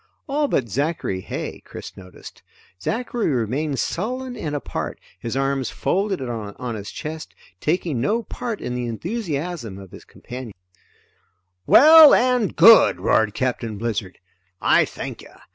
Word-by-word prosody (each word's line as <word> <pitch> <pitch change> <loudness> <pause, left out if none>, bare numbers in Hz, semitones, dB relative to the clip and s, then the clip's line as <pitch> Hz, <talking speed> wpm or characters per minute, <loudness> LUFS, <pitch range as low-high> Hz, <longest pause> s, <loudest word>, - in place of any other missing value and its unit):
All 290 +1 0
but 130 - 0
Zachary 140 - -2
Heigh, - - -6
Chris - - -10
noticed. 90 -1 -13 0.4
Zachary 235 - -2
remained 135 +3 -1
sullen 250 - -3
and 155 -10 -4
apart, 145 - -4 0.2
his 115 +6 -4
arms 135 -2 0
folded 195 0 -1
on 115 +1 -5
his 105 -2 -6
chest, 155 +1 -7 0.2
taking 155 -6 -1
no 225 - 0
part 235 -1 -5
in 125 - -4
the 125 -1 -3
enthusiasm 160 - -4
of 95 -2 -12
his - - -12
companions. 125 -4 -9 1.1
"Well 310 +1 +9
and 250 -4 +1
good," 230 0 +7
roared 105 -2 +2
Captain 120 -4 -2
Blizzard. 105 -4 -3 0.4
"I - - +4
thank - - -7
you. - - -14
140 Hz, 135 wpm, -22 LUFS, -, 1.1 s, Well